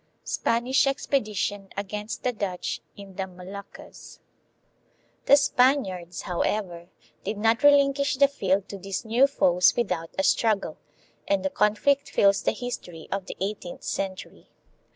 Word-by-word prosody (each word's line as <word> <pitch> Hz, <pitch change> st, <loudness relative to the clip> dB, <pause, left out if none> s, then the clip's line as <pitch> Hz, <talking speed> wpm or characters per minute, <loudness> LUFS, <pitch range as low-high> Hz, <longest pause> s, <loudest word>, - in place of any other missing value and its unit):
Spanish 245 Hz, +4 st, +1 dB
Expedition 210 Hz, -7 st, -1 dB
against 210 Hz, +2 st, -5 dB
the 250 Hz, -, 0 dB
Dutch 195 Hz, -5 st, -3 dB, 0.2 s
in 195 Hz, -2 st, -12 dB
the 190 Hz, -1 st, -2 dB
Moluccas. 185 Hz, +2 st, -11 dB, 1.1 s
The 285 Hz, -, +8 dB
Spaniards, 245 Hz, -11 st, +1 dB
however, 175 Hz, -1 st, -2 dB, 0.3 s
did 210 Hz, +2 st, -3 dB
not 225 Hz, +3 st, +2 dB
relinquish 280 Hz, -1 st, +4 dB
the 280 Hz, +1 st, +6 dB
field 195 Hz, -8 st, 0 dB
to 200 Hz, -, -7 dB
these 195 Hz, +4 st, -4 dB
new 240 Hz, +5 st, +4 dB
foes 180 Hz, -10 st, +3 dB
without 180 Hz, -8 st, -1 dB
a 190 Hz, -, +1 dB
struggle, 215 Hz, -1 st, +1 dB, 0.5 s
and 195 Hz, -1 st, +1 dB
the 190 Hz, -, 0 dB
conflict 270 Hz, +7 st, +2 dB
fills 200 Hz, 0 st, +3 dB
the -, -, +1 dB
history 180 Hz, -9 st, -7 dB
of 195 Hz, -1 st, -3 dB
the -, -, -7 dB
eighteenth 195 Hz, -2 st, -5 dB
century. 190 Hz, -1 st, -5 dB
200 Hz, 130 wpm, -26 LUFS, 190-245 Hz, 1.1 s, The